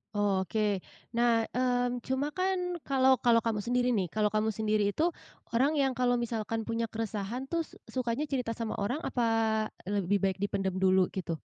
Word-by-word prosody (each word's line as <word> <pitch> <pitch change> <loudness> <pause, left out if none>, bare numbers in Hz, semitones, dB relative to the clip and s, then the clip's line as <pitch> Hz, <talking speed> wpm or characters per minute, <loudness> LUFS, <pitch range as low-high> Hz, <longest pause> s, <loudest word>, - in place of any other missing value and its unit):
Oh, 195 -3 +1
oke. 210 -2 +1 0.3
Nah, 235 -1 +3
mmm, 245 0 +1
cuma 270 +3 0
kan 360 0 -1
kalau 265 -2 +4
kalau 230 -2 +4
kamu 225 -2 0
sendiri 245 +3 +1
nih 195 -6 +1
kalau 210 +3 0
kamu 215 +1 +1
sendiri 210 -2 +1
itu 340 +3 +2 0.4
orang 270 +6 +2
yang 270 -2 +2
kalau 245 0 +1
misalkan 225 -1 -2
punya 230 0 -2
keresahan 220 +2 -4
tuh 335 -1 0
s - - -17 0.2
sukanya 250 +2 -1
cerita 250 -6 -2
sama 230 -2 -3
orang 250 +10 -2
apa 245 - -1 0.6
lebih 200 0 0
baik 190 0 +1
dipendem 195 -2 -1
dulu 190 -1 +3
gitu? 170 -3 -3
230 Hz, 170 wpm, -30 LUFS, 205-255 Hz, 0.6 s, kalau